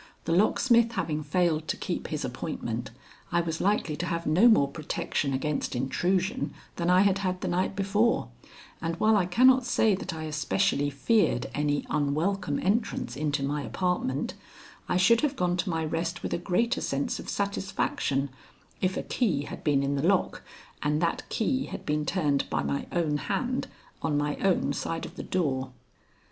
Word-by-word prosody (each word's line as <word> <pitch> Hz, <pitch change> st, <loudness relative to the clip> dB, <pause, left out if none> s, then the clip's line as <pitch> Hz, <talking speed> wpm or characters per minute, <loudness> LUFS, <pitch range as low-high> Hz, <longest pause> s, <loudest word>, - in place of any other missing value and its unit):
The -, -, -1 dB
locksmith 230 Hz, +5 st, +4 dB
having 155 Hz, -9 st, -1 dB
failed 160 Hz, 0 st, +1 dB
to -, -, -1 dB
keep -, -, -3 dB
his -, -, -3 dB
appointment, -, -, -4 dB, 0.4 s
I 175 Hz, -, +3 dB
was 165 Hz, -1 st, -3 dB
likely 195 Hz, -6 st, +1 dB
to 175 Hz, -, -2 dB
have 170 Hz, -1 st, -2 dB
no 175 Hz, +10 st, +5 dB
more 220 Hz, -12 st, +5 dB
protection 145 Hz, -2 st, -2 dB
against 140 Hz, +1 st, -1 dB
intrusion 185 Hz, -, 0 dB, 0.2 s
than 170 Hz, 0 st, 0 dB
I 180 Hz, +1 st, +6 dB
had 195 Hz, -1 st, +3 dB
had 185 Hz, -2 st, -2 dB
the -, -, -2 dB
night 185 Hz, +2 st, 0 dB
before, 205 Hz, +4 st, +1 dB, 0.5 s
and 165 Hz, +1 st, -1 dB
while 215 Hz, +5 st, +3 dB
I 190 Hz, -4 st, +2 dB
cannot 255 Hz, +7 st, +5 dB
say 225 Hz, -3 st, +3 dB
that 190 Hz, 0 st, -3 dB
I 160 Hz, -1 st, -5 dB
especially 145 Hz, -3 st, +1 dB
feared 140 Hz, -, +1 dB
any 145 Hz, 0 st, 0 dB
unwelcome 150 Hz, +3 st, 0 dB
entrance 215 Hz, +6 st, 0 dB
into 145 Hz, -1 st, -1 dB
my 145 Hz, +2 st, -1 dB
apartment, 140 Hz, +1 st, -1 dB, 0.6 s
I -, -, +2 dB
should 230 Hz, +6 st, +5 dB
have 290 Hz, -2 st, 0 dB
gone 180 Hz, -7 st, +1 dB
to 185 Hz, +2 st, -1 dB
my 160 Hz, -2 st, -1 dB
rest 165 Hz, +2 st, -2 dB
with -, -, -2 dB
a -, -, 0 dB
greater 230 Hz, +9 st, 0 dB
sense 140 Hz, +1 st, -1 dB
of -, -, -7 dB
satisfaction 190 Hz, -8 st, -1 dB, 0.5 s
if 185 Hz, 0 st, +1 dB
a -, -, -2 dB
key 175 Hz, -, 0 dB
had -, -, -8 dB
been 140 Hz, -2 st, +2 dB
in 140 Hz, +1 st, 0 dB
the 145 Hz, +5 st, +1 dB
lock 195 Hz, -1 st, +1 dB, 0.4 s
and 150 Hz, +1 st, +1 dB
that 170 Hz, -, -1 dB
key 260 Hz, +4 st, 0 dB
had -, -, -7 dB
been 150 Hz, 0 st, -1 dB
turned 150 Hz, -7 st, +1 dB
by 75 Hz, -2 st, 0 dB
my 70 Hz, 0 st, -2 dB
own 160 Hz, -4 st, +1 dB
hand 255 Hz, -, -2 dB, 0.3 s
on 150 Hz, -2 st, 0 dB
my 145 Hz, 0 st, 0 dB
own 180 Hz, -7 st, +1 dB
side 165 Hz, +3 st, -3 dB
of -, -, -10 dB
the -, -, -5 dB
door. 135 Hz, -8 st, -1 dB
170 Hz, 180 wpm, -28 LUFS, 145-195 Hz, 0.6 s, I